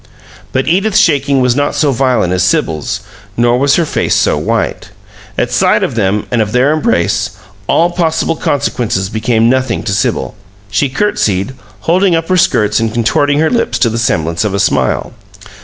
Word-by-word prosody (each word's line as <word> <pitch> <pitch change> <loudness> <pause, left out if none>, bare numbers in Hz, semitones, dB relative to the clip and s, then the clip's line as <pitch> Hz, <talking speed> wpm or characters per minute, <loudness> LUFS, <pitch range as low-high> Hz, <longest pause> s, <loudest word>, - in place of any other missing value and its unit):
But 130 - -1
Edith's 195 +5 +1
shaking 140 -8 +2
was 125 -1 +2
not 145 +1 0
so 145 -3 +2
violent 125 -8 +1
as 90 - 0
Sibyl's, 80 -3 -1 0.4
nor 120 +1 +2
was 140 +1 +3
her 170 - +1
face - - 0
so - - +2
white. - - -2 0.5
At - - -1
sight - - +2
of - - -1
them 105 -2 0
and 120 -2 +1
of 105 0 -2
their 130 +4 +3
embrace, 105 - 0 0.3
all 170 +2 +2
possible 165 -2 0
consequences 115 -10 -1
became 110 +1 +1
nothing 130 -2 0
to 105 -3 -2
Sibyl. 100 - -1 0.4
She 135 +7 +1
courtesied, 125 - -1 0.3
holding 180 - +2
up 165 +1 -2
her 185 - +2
skirts 105 - +2
and 115 -1 -1
contorting 120 +5 +1
her 160 - +1
lips 235 - 0
to 115 - +1
the 115 - -2
semblance 85 -6 0
of 105 -2 -1
a - - -1
smile. - - 0
125 Hz, 175 wpm, -13 LUFS, 105-150 Hz, 0.5 s, was